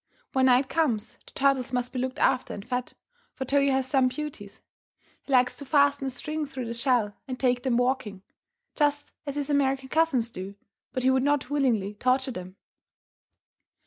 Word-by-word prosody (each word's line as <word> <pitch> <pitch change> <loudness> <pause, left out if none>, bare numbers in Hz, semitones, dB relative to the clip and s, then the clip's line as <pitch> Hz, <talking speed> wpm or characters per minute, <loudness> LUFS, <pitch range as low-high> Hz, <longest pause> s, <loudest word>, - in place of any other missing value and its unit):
When 265 0 +4
night 255 +1 +4
comes 265 -9 -1
the - - -14
turtles 270 -2 +2
must 245 0 -1
be 255 - -2
looked 260 +2 -2
after 260 -3 +1
and 200 +2 -9
fed, 250 0 -3 0.4
for 265 - -4
Toyo 280 +1 +3
has 265 0 +1
some 260 -1 +3
beauties. 255 -7 -7 0.6
He - - -10
likes 250 -1 +4
to - - -7
fasten 280 0 +3
a - - 0
string 305 +4 -4
through 260 -3 -5
the 230 - -4
shell 235 -4 +1
and 255 -2 -5
take 250 -2 +2
them 245 -2 +1
walking, 245 -6 -1 0.5
just 290 -1 0
as 280 - -3
his 290 0 -2
American 270 -2 +1
cousins 275 -8 +2
do, 190 +1 -7 0.4
but 255 - -3
he 260 - +4
would 260 0 +3
not 285 -1 0
willingly 235 -9 +1
torture 255 +5 +1
them. 185 -3 -8
260 Hz, 180 wpm, -27 LUFS, 245-280 Hz, 0.6 s, When